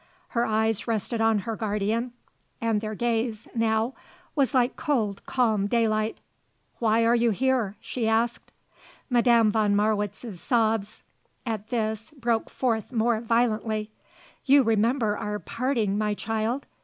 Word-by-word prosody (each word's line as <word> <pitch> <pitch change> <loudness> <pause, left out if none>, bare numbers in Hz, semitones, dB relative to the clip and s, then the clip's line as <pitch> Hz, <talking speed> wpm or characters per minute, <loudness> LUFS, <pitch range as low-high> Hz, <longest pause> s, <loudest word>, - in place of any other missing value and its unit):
Her 235 -1 0
eyes 220 0 0
rested 225 +1 -1
on 225 -1 +3
her 225 - -2
guardian 220 +3 -1 0.5
and 225 -2 0
their 215 0 -4
gaze, 230 -1 -1
now, 225 +1 +1 0.4
was 275 -2 +1
like 250 0 +2
cold, 220 -10 -1
calm 220 -6 +1
daylight. 220 -1 +1 0.6
"Why 230 0 +3
are 230 - +4
you 235 0 +3
here?" 235 -2 +1
she 230 -1 -3
asked. 230 +2 0 0.6
Madame 235 -3 +4
von 210 -2 +2
Marwitz's 210 -1 -1
sobs, 220 -3 0 0.4
at 220 -3 -3
this, 220 -1 -2
broke 235 -2 0
forth 230 -4 -1
more 230 -1 +1
violently. 220 -2 0 0.5
"You 280 0 +5
remember 225 0 +2
our 210 0 -3
parting, 230 -3 -1
my 210 -1 0
child! 225 +5 -2
225 Hz, 130 wpm, -26 LUFS, 215-235 Hz, 0.6 s, You